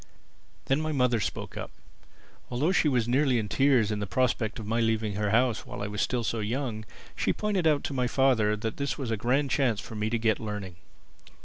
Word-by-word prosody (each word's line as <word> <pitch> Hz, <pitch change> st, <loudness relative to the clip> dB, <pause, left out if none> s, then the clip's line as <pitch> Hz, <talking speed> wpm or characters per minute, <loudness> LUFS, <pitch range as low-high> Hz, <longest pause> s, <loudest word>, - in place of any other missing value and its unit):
Then 135 Hz, +3 st, +1 dB
my 155 Hz, 0 st, -2 dB
mother 125 Hz, -5 st, +2 dB
spoke -, -, -4 dB
up. -, -, -5 dB, 0.8 s
Although 140 Hz, +8 st, +1 dB
she 175 Hz, -, +3 dB
was 125 Hz, -4 st, +1 dB
nearly 130 Hz, 0 st, +3 dB
in 110 Hz, -2 st, -1 dB
tears 125 Hz, -2 st, +3 dB
at 105 Hz, -, -1 dB
the 100 Hz, -, -3 dB
prospect 120 Hz, -1 st, 0 dB
of 110 Hz, -, -6 dB
my 115 Hz, +2 st, 0 dB
leaving 110 Hz, -2 st, +1 dB
her 105 Hz, +1 st, -1 dB
house 115 Hz, +2 st, +2 dB
while -, -, -7 dB
I -, -, -2 dB
was 105 Hz, 0 st, -3 dB
still 125 Hz, -2 st, 0 dB
so 115 Hz, 0 st, -1 dB
young, 110 Hz, 0 st, -3 dB, 0.3 s
she -, -, +1 dB
pointed 200 Hz, -5 st, 0 dB
out 150 Hz, -2 st, +2 dB
to -, -, -3 dB
my 125 Hz, -2 st, 0 dB
father 120 Hz, -5 st, +3 dB
that 110 Hz, +1 st, -4 dB
this 140 Hz, 0 st, -2 dB
was 130 Hz, -5 st, -3 dB
a -, -, +2 dB
grand 130 Hz, +6 st, +1 dB
chance 120 Hz, -7 st, +2 dB
for 110 Hz, -, -8 dB
me 105 Hz, 0 st, -1 dB
to 115 Hz, -, 0 dB
get 110 Hz, -2 st, +1 dB
learning. 105 Hz, -5 st, -5 dB
115 Hz, 220 wpm, -28 LUFS, 110-135 Hz, 0.8 s, she